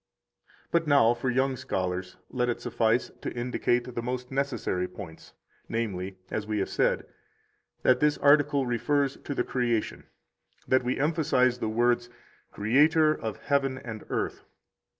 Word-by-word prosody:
But 165 -2 +2
now 140 -5 +5
for 120 +2 -2
young 130 +2 +1
scholars 95 -7 -3
let 125 -1 0
it 120 - -1
suffice 115 +1 +1
to - - -3
indicate 120 0 -1
the 120 - -3
most 125 +1 -4
necessary 135 -9 -1
points, 85 -3 -11 0.3
namely, 95 -5 -3
as 105 -1 -3
we 110 0 -1
have 100 - -1
said, - - +1 0.8
that 125 -1 +4
this 150 +1 +2
article 145 -1 +4
refers 140 +3 0
to 145 - -6
the - - +1
Creation: 120 -3 -1 0.6
that 130 0 +3
we 125 +1 -1
emphasize 135 -5 +2
the 110 - -1
words: 120 +1 +1 0.4
Creator 155 +8 +4
of 110 -8 -5
heaven 135 -2 +1
and 110 -4 -7
earth. - - -2
125 Hz, 145 wpm, -28 LUFS, 115-140 Hz, 0.8 s, now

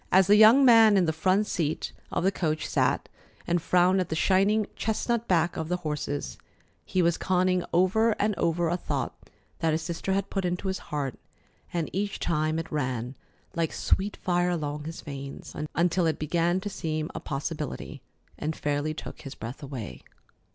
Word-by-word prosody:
As 190 +1 +6
the 205 +3 +6
young 220 +6 +8
man 225 -4 +7
in 185 - +4
the 160 - 0
front 185 +6 +2
seat 160 -6 -2 0.2
of - - -1
the 190 - +3
coach 155 -5 -1
sat - - +1 0.4
and 175 0 +1
frowned 180 +3 +3
at 185 - -1
the 160 - -1
shining 200 +5 +3
chestnut 230 +1 -1
backs 170 -2 +2
of 160 0 -4
the 180 - +1
horses, 150 -1 -3 0.4
he 185 -2 0
was 170 0 +2
conning 185 -1 +2
over 215 +6 +3
and 210 +1 0
over 170 0 +1
a 175 +2 0
thought - - -3 0.5
that 165 -3 +1
his 160 +1 -1
sister 170 +4 -2
had 195 0 -1
put 195 - -1
into 180 +2 -1
his 190 - -2
heart, 140 -4 -3 0.5
and 170 -2 -1
each 200 +1 -2
time 155 -1 0
it 165 0 -5
ran 130 -4 -2 0.4
like 165 -2 0
sweet 205 +2 0
fire 175 0 +1
along 150 -3 -3
his 160 +1 -6
veins, 140 -2 -8 0.2
until 175 0 +2
it 155 - 0
began 170 +3 +1
to 205 - -5
seem 155 -3 -3
a - - -4
possibility, 150 0 -5 0.4
and 155 +1 -2
fairly 150 +1 -1
took - - -8
his 135 -1 -8
breath 115 +5 -7
away. 135 -7 -7
170 Hz, 180 wpm, -27 LUFS, 155-190 Hz, 0.5 s, young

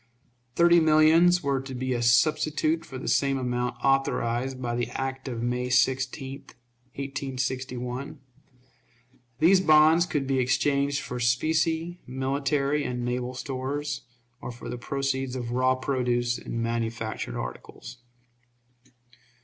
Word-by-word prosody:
Thirty 170 0 +6
millions 160 +3 +5
were 140 -2 0
to 135 -1 -8
be 130 +1 -2
a 120 - -1
substitute 155 +6 +2
for 135 - -8
the - - -7
same 140 -1 +2
amount, 125 -1 -2
authorized 130 -1 0
by 120 -2 -2
the 120 0 -1
act 135 0 -4
of 120 -3 -4
May 125 +1 -1
16, 130 +2 0 0.6
1861. 130 -1 -4 1.2
These 185 +6 +5
bonds 160 +1 +5
could 145 -5 -1
be 135 -1 0
exchanged 140 +2 +1
for 125 - -5
specie, 160 +7 0
military 140 +2 0
and 125 -2 -3
naval 125 +1 -3
stores, 135 +3 -4 0.4
or - - -5
for 120 - -9
the - - -4
proceeds 135 0 -2
of 120 -2 -4
raw 130 +1 +2
produce 120 -2 -1
and 115 0 -4
manufactured 115 -1 -3
articles. 60 - -8
130 Hz, 125 wpm, -26 LUFS, 125-145 Hz, 1.2 s, Thirty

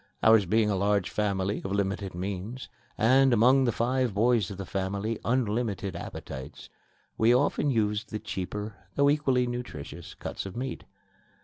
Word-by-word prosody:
Ours 110 -3 +6
being 110 +3 +3
a - - +1
large 100 0 +1
family 100 -1 -1
of 95 - -4
limited 100 -1 -1
means 100 +7 -5 0.3
and, 130 +4 +5
among 125 +4 +5
the 120 - +2
five 120 -1 0
boys 115 -2 +3
of 100 - -7
the 100 - -5
family, 100 +4 -2
unlimited 110 -5 -1
appetites, 65 -1 -8 0.5
we 115 +2 +5
often 145 +2 +2
used 105 -3 0
the 110 - -3
cheaper, 105 +2 -5 0.2
though 140 0 +4
equally 135 -4 +2
nutritious, 120 - -6
cuts - - -5
of 95 - -8
meat. 130 0 -4
110 Hz, 150 wpm, -28 LUFS, 100-125 Hz, 0.5 s, Ours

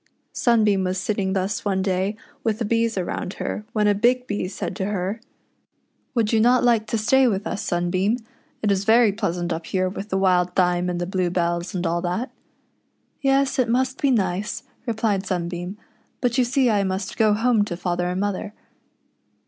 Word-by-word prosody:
Sunbeam 215 -6 +3
was 185 +1 -1
sitting 190 0 -1
thus 195 +1 -1
one 190 -2 0
day 190 +2 0 0.3
with 220 -2 0
the 230 - -2
bees 230 0 +1
around 185 +1 -3
her, 210 - -4
when 210 -1 +1
a 205 - +5
Big 245 +5 +2
Bee 205 -5 -2
said 185 - -5
to 190 - -1
her, 200 +2 -2 0.4
— - - -47
"Would 230 -2 +1
you 225 - +4
not 245 +3 +4
like 230 -3 +3
to 230 - -1
stay 255 +5 +4
with 200 -2 -1
us, - - -3
Sunbeam 185 +6 0 0.2
} - - -38
It 210 - +3
is 195 0 +1
very 225 +1 +5
pleasant 180 -4 -2
up 165 0 -6
here 185 -1 0
with 195 +3 -6
the 190 - 0
wild 180 -2 +2
th}'me 180 -1 +2
and 175 -1 -2
the 175 - -1
blue 185 -1 0
bells, 170 0 -1
and 180 0 -2
all 170 +1 0
that." 185 +9 -2 0.9
"Yes, 275 0 +2
it 245 -2 +2
must 260 +3 0
be 280 - +3
nice," 205 -1 0 0.2
replied 215 -4 0
Sunbeam; 175 +1 -3 0.4
"but 245 -2 0
you 255 - +3
see 260 +1 +2
I 210 -3 +2
must 190 0 -3
go 215 -2 +4
home 225 -1 +3
to 175 -4 -5
father 175 -1 -1
and 180 +1 -2
mother." 205 0 -2
200 Hz, 195 wpm, -23 LUFS, 185-225 Hz, 0.9 s, a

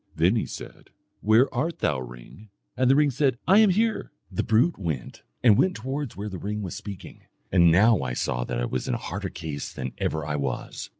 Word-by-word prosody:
Then 85 +7 +3
he 110 - -1
said, - - -10 0.3
'Where 110 +5 +4
art 155 +7 -1
thou, 70 -3 0
ring?' 60 - -11 0.3
And 130 -1 +2
the 135 - +6
ring 145 -1 +4
said, 135 -1 +1
'I 195 +5 +7
am 215 -2 +6
here.' 220 +4 0 0.2
The - - -1
brute 120 +8 +2
went 80 -8 -4 0.2
and 110 -5 +6
went 185 -1 +3
towards 135 0 -4
where 105 +1 -4
the 95 -3 -6
ring 105 +1 -4
was 90 - -5
speaking, 100 -3 -9 0.3
and 85 -2 +6
now 105 +4 +5
I 60 - -3
saw - - -1
that - - -3
I - - 0
was 65 +1 -3
in - - 0
a - - -6
harder 95 0 -3
case 80 -5 -6
than 65 0 -5
ever 80 -2 -1
I 75 -1 -2
was. 70 -2 -4
105 Hz, 220 wpm, -25 LUFS, 80-130 Hz, 0.3 s, I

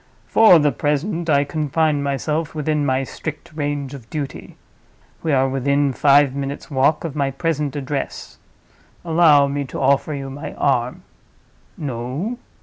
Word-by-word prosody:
For 220 -6 +6
the 150 -2 +3
present, 160 - -1
I 140 -2 +4
confine 150 0 0
myself 150 +3 -2
within 150 -1 0
my 130 0 +1
strict 155 +3 -7
range 145 -2 -3
of 125 -5 -11
duty. 145 -3 -6 0.6
We 160 - -1
are 135 -1 +3
within 140 +1 +1
five 140 0 +4
minutes' 140 +2 -5
walk 140 +3 +2
of 160 -4 -5
my 140 -2 0
present 150 0 -2
address. 140 0 -5 0.7
Allow 160 -4 +5
me 140 +1 -2
to - - -7
offer 140 +2 +2
you 135 -1 -6
my 145 +3 -7
arm. 125 -2 0 0.7
No? 140 - -4
145 Hz, 145 wpm, -20 LUFS, 135-155 Hz, 0.7 s, For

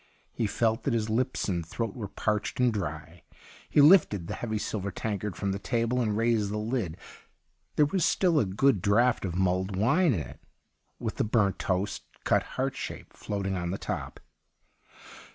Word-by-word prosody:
He 115 - -1
felt 115 +2 +1
that - - 0
his 110 -1 -1
lips 130 +3 0
and 90 -4 -1
throat 105 +6 -4
were 110 -5 -5
parched 105 +3 -2
and 125 -2 +3
dry. 85 -3 -5 0.5
He 145 - +5
lifted 145 - +6
the - - -5
heavy 110 -2 -3
silver 100 -2 -3
tankard 105 -1 -3
fi'oni 100 +2 -2
the 100 - -3
table 120 +3 0
and 105 -3 0
raised 115 -3 +2
the 105 - -2
lid; 105 -6 -2 0.8
there 150 - +5
was 180 +4 0
still 175 -3 +3
a 115 - +2
good 100 +3 +2
draught 115 +4 +3
of 90 -3 -3
mulled 95 +1 0
wine 140 - +3
in 85 - -1
it - - -9 0.6
with - - -4
the - - +2
burnt 105 -3 +1
toast, 95 +2 -1 0.2
cut - - +3 0.2
heart - - 0
shape, - - -7
floating 95 -2 -3
on 85 -1 -2
the 95 - -2
top. - - -5
105 Hz, 180 wpm, -28 LUFS, 95-120 Hz, 0.8 s, lifted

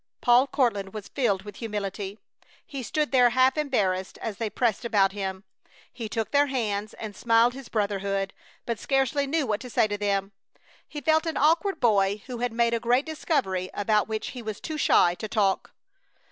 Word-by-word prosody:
Paul 245 +3 +5
Courtland 220 -8 0
was 210 -2 -7
filled 205 -8 0
with 205 -1 -10
humility. 205 -2 -4 0.5
He 275 -2 -6
stood 300 +5 -1
there 250 -2 +5
half 255 +2 +3
embarrassed 200 -11 0
as 215 -3 -5
they 225 -2 -2
pressed 230 -1 0
about 205 -4 +3
him. 190 -1 -4 0.5
He 235 -3 -6
took 220 -1 -3
their 285 0 +4
hands 215 -6 -2
and 215 -2 -7
smiled 230 +2 +3
his 265 -1 -10
brotherhood, 200 -2 -1 0.3
but 235 -2 -3
scarcely 270 +1 +1
knew 300 +1 0
what 210 -4 -1
to 250 - -9
say 220 - +3
to 205 -1 -4
them. 200 -1 0 0.6
He 295 - -7
felt 315 +3 +2
an 325 - -2
awkward 330 +7 +2
boy 205 -3 +2
who 250 -2 -6
had 245 0 -1
made 235 0 +1
a 230 - +1
great 245 +4 +2
discovery 265 - -1
about 210 +1 +1
which 220 -1 -3
he 250 - -7
was 215 -2 -5
too 310 -1 -5
shy 175 -10 +4
to 215 +5 -6
talk. 200 -3 0
225 Hz, 190 wpm, -26 LUFS, 200-260 Hz, 0.6 s, Paul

